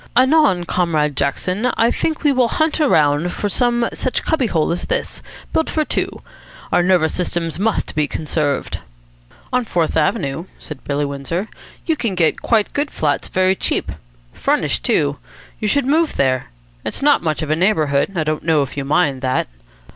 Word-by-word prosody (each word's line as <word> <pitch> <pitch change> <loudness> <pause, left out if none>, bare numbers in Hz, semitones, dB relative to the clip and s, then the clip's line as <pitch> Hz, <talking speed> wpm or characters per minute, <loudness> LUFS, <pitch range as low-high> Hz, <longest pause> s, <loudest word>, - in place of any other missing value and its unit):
Anon, 260 - +4
Comrade 160 -5 0
Jackson, 180 - 0
I 230 +1 +3
think 315 -1 -2
we 295 - +4
will 255 -3 +3
hunt 315 +5 0
around 155 - +3
for 205 - -2
some 240 +2 +1
such 255 - -1
cubby 275 -7 +1
hole 160 -6 +1
as 175 - -2
this, - - -2 0.3
built 320 - +1
for 310 -1 0
two. - - -2 0.5
Our - - +4
nervous 175 -3 +3
systems 170 -2 -2
must 220 +2 0
be 150 -1 +1
conserved." 150 -3 -2 0.7
"On 250 0 +2
Fourth 175 -7 -1
Avenue," 150 0 0
said 150 -5 -9
Billy 145 0 0
Windsor, 140 +8 -3 0.4
"you 325 - +1
can 230 -9 -2
get 165 -3 +1
quite 220 -3 +1
good 290 +1 -1
flats 145 -2 -1
very 185 0 +2
cheap. - - -1 0.4
Furnished, - - 0
too. 70 - +1 0.4
You 215 - -1
should 280 +4 +2
move 315 +4 +2
there. 130 -2 +1 0.4
It's - - -2
not 290 0 +4
much 155 -1 -1
of 155 - -3
a - - +3
neighbourhood. 160 -3 +1
I 165 - +1
don't 155 0 -1
know 160 -3 +3
if 135 - -8
you 140 - -2
mind 140 -2 +1
that?" 130 -1 0
175 Hz, 175 wpm, -19 LUFS, 150-240 Hz, 0.7 s, Anon